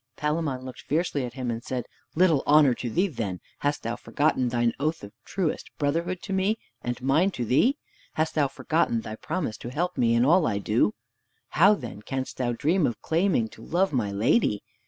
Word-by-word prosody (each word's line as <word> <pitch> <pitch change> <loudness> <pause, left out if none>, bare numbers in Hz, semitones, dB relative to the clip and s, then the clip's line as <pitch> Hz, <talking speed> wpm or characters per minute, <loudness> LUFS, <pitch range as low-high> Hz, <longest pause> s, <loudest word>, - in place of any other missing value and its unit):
Palamon 150 -4 -1
looked 130 - -8
fiercely 150 -3 -1
at 120 - -8
him 125 -3 -2
and 115 0 -5
said, 125 -3 -3 0.3
"Little 165 -5 +4
honor 145 -3 +6
to 120 0 -4
thee 180 - +2
then! 105 - -4 0.2
Hast 145 0 -1
thou 115 +1 -2
forgotten 130 +2 0
thine 120 -1 +1
oath 155 0 -1
of 100 - -8
truest 185 -5 -2
brotherhood 170 +5 -1
to 195 - -4
me, 195 +3 +1 0.2
and 120 0 -3
mine 150 +8 +3
to 125 -10 -4
thee? 235 - +3 0.4
Hast 160 0 0
thou 145 -3 +2
forgotten 155 -5 0
thy 110 0 -6
promise 140 -2 -3
to 120 - -7
help 175 +7 -2
me 115 -1 +3
in 120 +1 +4
all 170 +3 +4
I 105 -3 0
do? 105 +1 +1 0.5
How, 200 +6 +5
then, 120 - -8
canst 130 +4 -4
thou 125 -2 0
dream 155 +7 +2
of 120 - -4
claiming 165 - +2
to 110 - -15
love 180 +6 0
my 110 -6 0
lady? 105 - +2
140 Hz, 200 wpm, -26 LUFS, 120-165 Hz, 0.5 s, honor